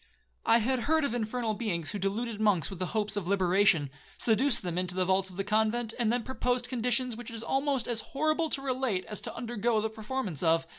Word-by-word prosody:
I 230 - +7
had 250 +3 +1
heard 320 -1 +4
of 280 - 0
infernal 230 -1 -1
beings 190 -8 -2
who 205 - -4
deluded 210 +3 -2
monks 200 -6 +2
with 190 - -7
the 185 - -1
hopes 210 0 -1
of 200 -4 -3
liberation, 185 -6 +3 0.3
seduced 240 +3 +3
them 175 -1 -2
into 180 -1 -2
the 185 0 +1
vaults 190 +1 +2
of 185 - -12
the 195 - 0
convent, 220 +2 +1
and 230 -2 +2
then 240 0 0
proposed 250 -1 -1
conditions 250 0 0
which 240 0 -8
it 230 - -7
is 225 - -6
almost 270 0 0
as 235 -2 -1
horrible 310 +5 0
to 275 - -2
relate 255 -8 -1
as 210 - -5
to - - -6
undergo 235 -1 0
the 220 +1 -1
performance 220 - -3
of. 165 0 +3
220 Hz, 225 wpm, -30 LUFS, 195-245 Hz, 0.3 s, I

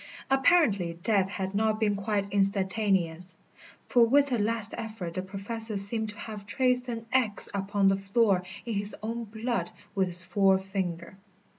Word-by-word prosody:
Apparently 260 - +3
death 195 -3 +2
had 190 -1 -4
not 215 +1 +1
been 210 -2 +2
quite 200 0 -2
instantaneous, 190 -3 0 0.5
for 240 - +5
with 280 +4 +4
a 240 - +1
last 220 0 -1
effort 215 -7 -6
the 185 - -2
Professor 205 +3 -4
seemed 215 +2 -1
to 210 - -10
have 210 -2 -8
traced 250 +1 +1
an 230 -1 -4
X 240 -6 +1
upon 200 0 +1
the 195 0 +4
floor 195 -1 +2 0.2
in 235 - -3
his 205 0 0
own 230 +1 -3
blood 230 +3 -2 0.2
with 190 -2 +1
his 175 0 +3
forefinger. 190 -1 0
205 Hz, 155 wpm, -28 LUFS, 195-225 Hz, 0.5 s, for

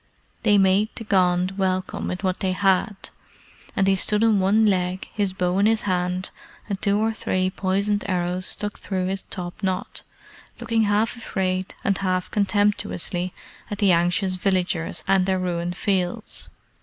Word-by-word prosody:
They 210 -2 +4
made 195 +2 +3
the - - -6
Gond 185 -2 +1
welcome 185 -1 -1
with 180 +1 -4
what 185 -1 0
they 185 -1 0
had, 195 +1 0 0.6
and 195 - +2
he 195 - +4
stood 210 +3 +4
on 220 -3 +4
one 205 +4 +3
leg, 185 -2 0
his 205 -2 0
bow 185 0 0
in 205 - +4
his 225 0 +2
hand, 180 -1 -1 0.4
and 200 -3 -4
two 200 -1 +2
or 220 +1 +1
three 185 -3 -1
poisoned 200 +2 0
arrows 180 -1 -1
stuck 205 -1 -2
through 185 -2 -2
his 190 +1 -2
top 180 +2 -7
knot, 190 -2 -2 0.6
looking 225 -2 +1
half 210 +3 +1
afraid 190 -5 -2
and 200 -1 +1
half 185 -1 -1
contemptuously 200 -3 0 0.4
at 205 - -4
the 200 -2 +4
anxious 175 +3 +2
villagers 185 -2 -1
and 190 -1 +3
their 190 -1 +2
ruined 175 -1 -2
fields. 195 +2 -2
190 Hz, 160 wpm, -23 LUFS, 185-205 Hz, 0.6 s, They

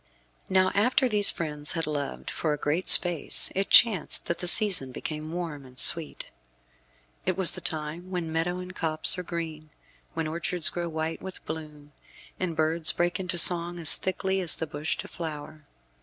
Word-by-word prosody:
Now 185 0 +2
after 250 +5 +1
these 210 -3 +4
friends 150 -2 -1
had 165 -1 -3
loved 145 -2 -6
for 155 -2 -3
a - - -4
great 150 +5 -3
space 175 -4 +6
it 195 +1 -3
chanced 215 -8 +4
that 170 - -4
the 180 - -3
season 180 - +4
became 155 +4 -7
warm 165 -5 -6
and 130 -1 -17
sweet. 165 +3 -1 1.0
It 185 - -1
was 190 -3 +5
the - - -5
time 160 +3 -6
when 175 -3 -5
meadow 165 +2 -2
and 180 0 -9
copse 155 +1 0
are - - -3
green; 165 -3 -7 0.5
when 165 -1 -3
orchards 170 +2 +1
grow 175 -1 -5
white 160 0 -5
with 190 -1 -9
bloom, 150 -2 -9 0.5
and 180 -3 -4
birds 160 +1 +3
break 175 +1 -2
into 180 -2 -4
song 175 0 +5
as 165 -3 +2
thickly 190 0 -3
as 175 - +1
the 160 - -5
bush 150 0 -5
to - - -8
flower. 155 -2 -9
165 Hz, 175 wpm, -25 LUFS, 155-180 Hz, 1.0 s, space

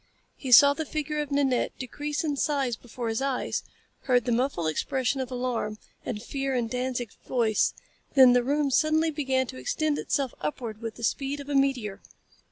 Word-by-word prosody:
He 265 - -6
saw 280 +4 +9
the 320 - -3
figure 300 0 -3
of 295 - -5
Nanette 280 -3 +1
decrease 290 +4 -3
in 300 -3 -1
size 275 -4 0
before 240 +1 -7
his 225 +2 -1
eyes, 270 -2 -1 0.4
heard 245 -3 +3
the 245 - 0
muffled 235 - 0
expression 260 - 0
of 255 - -4
alarm 245 -4 -2 0.3
and 215 -2 -4
fear 270 +1 -2
in 240 -2 0
Danzig's 250 -2 -3
voice; 225 -4 +2 0.4
then 260 -3 +8
the 245 - +4
room 285 +2 +1
suddenly 315 +3 +3
began 265 -3 0
to 225 - -9
extend 295 - -1
itself 275 -4 -1
upward 215 +8 -4
with 225 -1 -5
the 235 - -10
speed 275 +5 -1
of 285 0 -8
a 285 - -1
meteor. 255 -8 +1
260 Hz, 180 wpm, -27 LUFS, 240-285 Hz, 0.4 s, saw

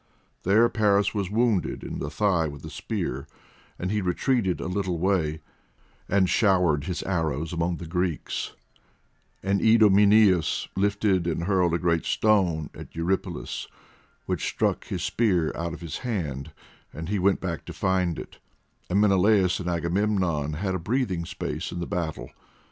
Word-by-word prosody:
There 110 +5 +4
Paris 105 -3 +2
was 100 -4 -2
wounded 110 -2 +1
in - - -5
the 70 - -3
thigh 85 0 +1
with 75 0 -8
a 80 - -8
spear, 80 - -4 0.5
and 90 +2 -3
he 105 0 0
retreated 95 +2 0
a - - -4
little 95 -2 -1
way, 80 -4 0 0.7
and 95 -1 +3
showered 90 -9 +3
his 90 -2 -3
arrows 80 -3 -1
among 85 +1 -1
the 85 - -7
Greeks; 90 0 -2 0.9
and 100 +1 +1
Idomeneus 105 -4 +5
lifted 100 -2 +1
and 85 0 -1
hurled 90 -3 +2
a - - +2
great 85 -1 0
stone 90 -8 +2
at - - -11
Eurypylus 85 +4 -2 0.6
which - - -2
struck - - 0
his 90 -2 -3
spear 95 -5 +1
out 85 -1 -3
of - - -13
his 85 - -5
hand, 80 - -3 0.4
and 80 +3 -7
he 105 -1 0
went 95 +1 +3
back 85 -5 -4
to - - -7
find 90 -3 0
it, - - -9 0.5
and 95 +3 +2
Menelaus 100 -2 +4
and 90 -1 -3
Agamemnon 85 -3 0
had 95 +5 -2
a 95 - -1
breathing 95 -3 -1
space - - -4
in 90 - -5
the 85 - -2
battle. 80 -9 -4
90 Hz, 155 wpm, -26 LUFS, 85-100 Hz, 0.9 s, Idomeneus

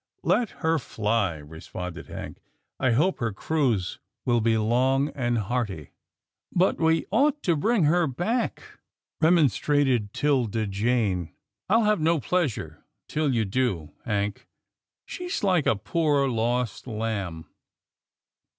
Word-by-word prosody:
" - - -48
Let 240 -4 +1 0.2
her 160 0 +3
fly," 105 - -1
responded 80 +3 -8
Hank, - - -8 0.2
" - - -53
I 130 -3 +2
hope 155 +9 +2
her 115 -3 -1
cruise 115 - -1 0.3
will 120 -2 +2
be 110 0 +2
long 130 +6 +2
and 120 -4 -1
hearty." 105 - -3 0.3
" - - -65
But 185 - +2
we 160 0 +2
ought 290 +7 +2
to 170 - +2
bring 215 +6 +2
her 165 +2 +3
back," 195 - -2 0.4
remonstrated 145 - +3
'Tilda 120 -7 +1
Jane, 100 -4 0 0.2
" - - -56
I'll 225 +3 +4
have 210 -1 +3
no 165 +1 +3
pleasure 125 - -2 0.2
till 155 -2 0
you 115 -3 +1
do. 95 -8 -1
Hank. 105 -1 -2 0.6
She's 360 - -4
like 180 -6 +2
a - - +4
poor 145 - +1
lost 120 -1 -1
lamb." 105 -8 -3
125 Hz, 135 wpm, -26 LUFS, 105-160 Hz, 0.6 s, I'll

